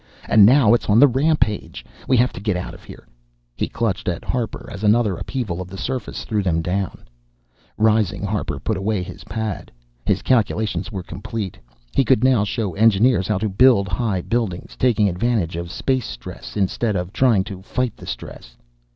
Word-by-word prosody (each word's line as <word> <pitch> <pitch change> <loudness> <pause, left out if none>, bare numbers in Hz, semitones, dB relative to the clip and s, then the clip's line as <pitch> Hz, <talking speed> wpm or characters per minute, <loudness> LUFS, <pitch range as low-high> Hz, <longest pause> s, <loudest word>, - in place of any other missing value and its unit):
And 105 -2 +7
now 125 -3 +6
it's 120 - 0
on 105 - +5
the 145 - +8
rampage. 135 -4 0 0.2
We 130 - +4
have 125 +2 +3
to - - -7
get 100 -2 -1
out 90 - -5
of - - -14
here - - -13 0.3
" - - -44
He - - -1
clutched 115 -6 -2
at 85 - -3
Harper 120 -4 -3
as 100 +1 -8
another 105 -2 +3
upheaval 95 -4 -4
of 90 - -6
the 95 - -8
surface 130 +2 -4
threw 105 -2 0
them 80 -4 0
down. 95 +2 -3 0.7
Rising, 105 -2 +2
Harper 105 +1 -2
put 110 -3 -2
away 95 0 -1
his - - -10
pad. 110 -3 -4 0.3
His - - 0
calculations 110 -3 0
were 95 -4 -5
complete. 105 -1 -6 0.3
He 135 - +3
could 125 -1 +3
now 130 -5 +4
show 105 -2 -2
engineers 110 0 +3
how 105 - +1
to 110 +3 -1
build 105 0 +4
high 100 -4 -1
buildings, 110 -5 -3
taking 115 -5 +2
advantage 100 -2 0
of 85 0 -5
space 130 +2 -1
stress - - -8
instead 105 +2 0
of 90 +1 -3
trying 115 -8 +3
to 95 -1 -8
fight 125 +4 -2
the - - -12
stress. - - -8
105 Hz, 185 wpm, -21 LUFS, 95-120 Hz, 0.7 s, the